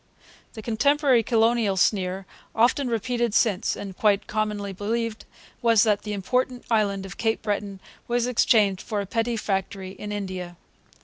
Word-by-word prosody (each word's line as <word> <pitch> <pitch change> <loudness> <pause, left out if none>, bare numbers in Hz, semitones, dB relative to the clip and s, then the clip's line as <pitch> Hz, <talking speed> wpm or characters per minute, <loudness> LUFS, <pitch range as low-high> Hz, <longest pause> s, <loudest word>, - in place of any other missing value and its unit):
The 220 - -9
contemporary 270 +2 +3
colonial 225 -3 +2
sneer, 190 -1 +1 0.3
often 250 +4 +3
repeated 235 0 -1
since, 205 -5 +2
and 195 -2 -7
quite 205 -1 +2
commonly 210 -2 -2
believed, 225 +3 -3 0.4
was 230 -3 +5
that 210 -2 +2
'the 210 - -5
important 250 +5 -1
island 200 -3 +1
of 195 +1 -9
Cape 225 -1 -1
Breton 205 -2 -3 0.3
was 240 0 +1
exchanged 215 -5 +3
for 210 - -3
a 200 - -2
petty 230 +3 -1
factory 195 -2 -3
in 205 +2 -7
India.' 185 -4 -5
215 Hz, 145 wpm, -25 LUFS, 195-230 Hz, 0.4 s, was